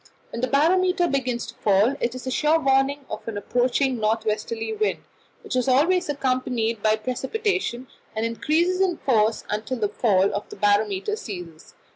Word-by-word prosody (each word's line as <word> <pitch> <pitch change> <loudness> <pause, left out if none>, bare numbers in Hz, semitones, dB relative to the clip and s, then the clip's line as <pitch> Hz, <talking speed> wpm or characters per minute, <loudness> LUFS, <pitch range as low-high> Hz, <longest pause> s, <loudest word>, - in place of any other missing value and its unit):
When 235 - -5
the 255 - +1
barometer 355 +5 +3
begins 255 -5 -1
to - - -9
fall, 205 +6 +2
it 235 +1 -1
is 255 - -8
a 260 - -2
sure 305 +5 +3
warning 275 0 +1
of 215 - -7
an 225 -2 -4
approaching 250 +3 0
north 220 +1 0
westerly 220 - -2
wind, 430 0 -1 0.4
which - - -4
is 255 0 +1
always 305 +7 +3
accompanied 255 -5 -1
by 215 0 +3
precipitation, 265 - -2 0.3
and 220 +1 -1
increases 330 +10 +1
in 370 -3 +1
force 225 -4 +1
until 215 +5 -3
the 210 -3 0
fall 200 -4 +2
of 205 - -4
the - - -9
barometer 205 - +1
ceases. 175 - -9
250 Hz, 170 wpm, -24 LUFS, 215-290 Hz, 0.4 s, barometer